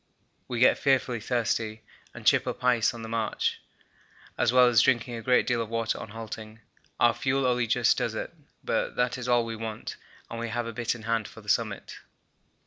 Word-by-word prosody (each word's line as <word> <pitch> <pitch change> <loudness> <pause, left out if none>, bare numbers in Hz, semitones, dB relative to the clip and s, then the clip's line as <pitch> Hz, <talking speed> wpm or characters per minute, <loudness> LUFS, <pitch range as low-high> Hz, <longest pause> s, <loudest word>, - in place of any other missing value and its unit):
We 120 - -3
get 125 - +5
fearfully 130 -3 +2
thirsty 110 -1 -1 0.3
and - - -11
chip - - +4
up - - -4
ice 125 -1 +3
on 115 -2 -9
the - - -6
march, 115 -1 -1 0.7
as 120 - +2
well 125 0 +6
as 120 -2 +5
drinking 125 -1 +2
a 115 - -5
great 125 +2 +3
deal 120 -2 +1
of 115 - -4
water 115 -1 -1
on - - -8
halting. 110 0 -8 0.4
Our 120 -1 +5
fuel 135 +1 0
only 125 -1 +1
just - - +3
does - - -2
it, - - -5 0.3
but - - -1
that 125 +1 0
is 125 - -5
all 120 -1 +3
we 115 0 -4
want, 110 -1 -6 0.3
and 115 - -6
we 115 0 -3
have 120 +1 -2
a 115 - -5
bit 120 +1 -1
in 115 - -11
hand 115 -1 0
for 110 - -13
the 105 - -10
summit. 105 -2 -1
115 Hz, 210 wpm, -27 LUFS, 110-125 Hz, 0.7 s, well